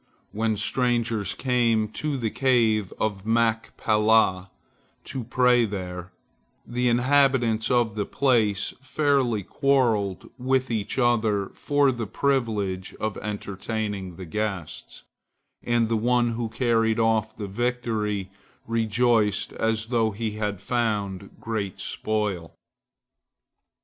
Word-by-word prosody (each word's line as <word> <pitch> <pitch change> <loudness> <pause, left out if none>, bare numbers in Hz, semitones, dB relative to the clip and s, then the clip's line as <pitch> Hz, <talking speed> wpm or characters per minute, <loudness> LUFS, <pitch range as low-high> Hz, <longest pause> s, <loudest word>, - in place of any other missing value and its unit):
When 110 0 0
strangers 115 -2 0
came 120 -4 +1
to 145 +5 -3
the 115 -4 -2
Cave 115 -7 +2
of 100 -3 -1
Machpelah 110 -3 +2 0.5
to 130 - -5
pray 125 0 +3
there, 90 -3 -6 0.5
the 125 +1 0
inhabitants 125 -3 +3
of 120 -3 +2
the 105 -1 -3
place 115 -7 +1
fairly 130 -5 +1
quarrelled 115 -5 +1
with 130 0 0
each 110 +1 -2
other 110 -5 +2
for 145 -1 +1
the 120 -3 -4
privilege 105 -7 -1
of 110 -1 -2
entertaining 100 -2 -4
the 95 - -8
guests, 95 -3 -5 0.6
and 120 -1 +1
the 115 - 0
one 120 +1 +2
who 115 0 -3
carried 115 -1 +1
off 110 -1 +1
the 105 - -4
victory 105 -3 -2 0.3
rejoiced 115 -2 +1
as 110 0 -1
though 115 -2 +3
he 110 +1 -3
had 105 -2 -3
found 105 -5 -1
great 105 -4 -4
spoil. 105 -6 -2
110 Hz, 110 wpm, -25 LUFS, 105-120 Hz, 0.6 s, pray